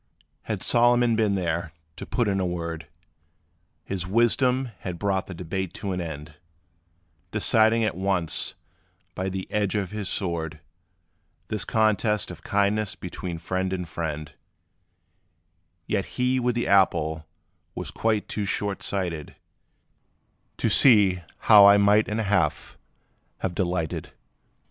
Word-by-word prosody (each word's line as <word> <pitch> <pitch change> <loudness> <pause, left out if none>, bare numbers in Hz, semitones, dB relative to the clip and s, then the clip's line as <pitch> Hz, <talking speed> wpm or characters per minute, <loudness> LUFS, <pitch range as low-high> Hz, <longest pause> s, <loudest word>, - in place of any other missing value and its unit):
Had - - -3
Solomon 120 0 +4
been 110 -3 +1
there 85 -3 -2 0.2
to - - -8
put 120 -3 0
in 100 -1 0
a - - 0
word, 85 -3 -5 1.0
His 90 -3 -4
wisdom 125 +4 +2
had 90 -2 -5
brought 95 0 -1
the 95 - -7
debate 90 +2 -4
to 100 - -4
an 90 -1 -2
end, 75 -2 -7 0.9
Deciding 110 +1 +3
at 110 - 0
once, 95 -4 -1 0.6
by 95 +1 -3
the 95 0 -4
edge 105 -2 0
of 100 -4 -2
his 105 -2 -4
sword, 80 -4 -3 0.9
This 105 -2 -1
contest 110 -1 +1
of - - -11
kindness 100 0 0
between 90 -1 -6
friend 95 +3 -2
and 90 -2 -3
friend: 80 -2 -5 1.5
Yet 100 -3 -1
he 125 +1 +2
with 125 -1 0
the 120 - -1
apple 80 -5 +2 0.5
was - - -5
quite 110 -2 0
too 105 - -3
short 100 0 -2
sighted 85 -6 -3 1.2
To - - 0
see 100 -8 +5 0.2
how 105 -2 +8
I 100 0 +7
might 105 +1 +4
in 105 +1 -2
a - - 0
half 95 -7 0 0.7
have 90 - -2
delighted. 85 -3 -2
95 Hz, 135 wpm, -25 LUFS, 85-105 Hz, 1.5 s, how